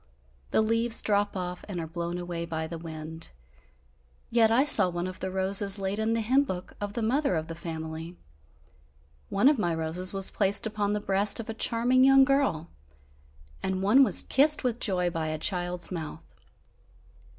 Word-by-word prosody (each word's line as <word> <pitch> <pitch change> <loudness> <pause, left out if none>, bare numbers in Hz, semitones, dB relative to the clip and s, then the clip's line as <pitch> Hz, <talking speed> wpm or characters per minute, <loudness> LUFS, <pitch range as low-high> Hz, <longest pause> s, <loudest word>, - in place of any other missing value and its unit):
The - - +1
leaves 230 +1 +2
drop 205 -1 0
off 180 -1 -6
and 190 -4 -6
are 165 - -4
blown 170 +2 -5
away 175 -1 -5
by 160 -1 -5
the 165 +1 -8
wind. 160 0 -5 1.0
Yet, 230 -1 +3
I 235 +4 +3
saw 295 -10 +7
one 175 0 -4
of 185 0 -7
the 190 - -4
roses 195 +1 +3
laid 195 +1 -4
in 220 +1 -1
the 230 - -1
hymn 260 +6 +2
book 185 -9 -7
of 205 0 -5
the 230 0 -4
mother 265 -1 0
of 160 0 -3
the 165 - -7
family; 160 0 -8 1.1
one 200 +7 +2
of 290 -4 +3
my 175 -4 -1
roses 165 +3 -1
was 195 -1 0
placed 200 +1 +1
upon 210 -1 -2
the 210 - -2
breast 200 +2 +3
of 230 - -7
a - - -3
charming 240 +3 +2
young 270 0 +6
girl, 270 - -1 0.9
and 190 0 -3
one 240 +8 +5
was - - +4
kissed 295 +3 +3
with 245 -2 -2
joy 180 -4 0
by 165 -2 -4
a 155 0 -3
child's 175 +1 -1
mouth. 160 -4 -7
190 Hz, 185 wpm, -26 LUFS, 170-225 Hz, 1.1 s, saw